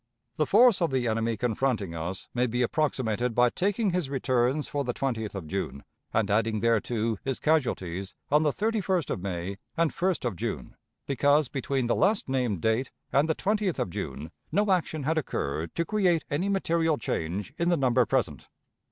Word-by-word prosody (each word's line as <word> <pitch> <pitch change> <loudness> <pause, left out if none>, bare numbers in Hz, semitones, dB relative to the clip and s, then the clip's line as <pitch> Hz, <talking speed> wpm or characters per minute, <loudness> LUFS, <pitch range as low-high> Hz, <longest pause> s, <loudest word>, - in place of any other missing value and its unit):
The 155 - +1
force 225 -1 +6
of 170 - +3
the 130 -2 0
enemy 115 0 0
confronting 110 -5 0
us 85 +3 -5
may 125 +1 +1
be 120 +2 0
approximated 125 -4 0
by 125 0 +4
taking 200 - 0
his 175 -6 -1
returns 130 +1 +1
for 145 -1 -2
the 125 -2 -3
20th 110 -6 -2
of 95 -4 -5
June 70 -2 -4 0.3
and 105 -2 +1
adding 110 +1 +2
thereto 115 -1 +1
his 135 -2 -2
casualties 100 - 0 0.2
on 150 +1 +5
the 155 - +3
31st 195 - 0
of - - -2
May 95 0 -4 0.2
and 165 -1 +2
1st 180 -4 0
of 120 -5 -1
June, - - -4 0.3
because 145 0 +3
between 135 -1 -1
the 120 - +2
last 200 +2 +2
named 125 -9 0
date 110 +4 +1 0.2
and 145 +4 +3
the 160 - +2
20th 205 -3 0
of 90 - -2
June 80 -1 -5 0.2
no 205 0 +2
action 160 -5 0
had 160 +3 +1
occurred 80 - -3
to 170 - 0
create 180 -5 +2
any 170 +8 0
material 165 -5 +1
change 95 +2 -3
in 170 +1 +2
the 175 - +3
number 130 -3 +3
present. - - -1
130 Hz, 180 wpm, -27 LUFS, 110-165 Hz, 0.3 s, force